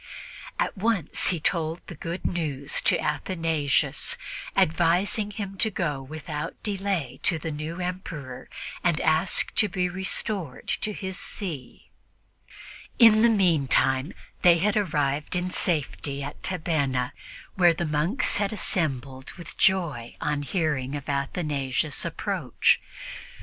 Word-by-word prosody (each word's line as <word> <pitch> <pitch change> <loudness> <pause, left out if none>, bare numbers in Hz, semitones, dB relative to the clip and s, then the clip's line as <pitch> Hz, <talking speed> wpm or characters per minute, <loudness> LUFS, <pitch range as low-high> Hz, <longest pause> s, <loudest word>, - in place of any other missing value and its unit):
At - - 0
once 200 -5 +1
he 175 - +2
told 160 +1 -1
the - - -8
good 170 +3 -6
news 145 -5 0
to - - +5
Athanasius, 160 -2 0 0.4
advising 175 +6 +2
him 200 -2 -6
to 220 - +5
go 150 -8 -2
without 150 +3 -5
delay 195 - -2
to 170 - +3
the 160 +1 -4
new 155 +4 -5
Emperor 170 -8 -5 0.3
and 170 -3 +2
ask 160 +4 +3
to 210 - +4
be 180 -1 0
restored 190 - -2
to 215 - 0
his 190 -2 -5
see. 165 -11 -6 1.1
In 225 -3 +7
the 235 - +6
meantime 150 - +2 0.3
they 175 -1 +7
had 200 +4 +1
arrived 150 -7 0
in 180 +1 -1
safety 145 -5 -1
at 145 +2 -7
Tabenna, 145 -8 0 0.4
where 175 -3 +5
the 170 - -2
monks 155 - +1
had 200 -1 0
assembled 135 - -1
with 175 - -8
joy 165 -12 +1
on 150 0 -1
hearing 145 -4 -1
of 145 -1 -6
Athanasius' 140 -1 -1
approach. - - +1
165 Hz, 125 wpm, -26 LUFS, 145-185 Hz, 1.1 s, In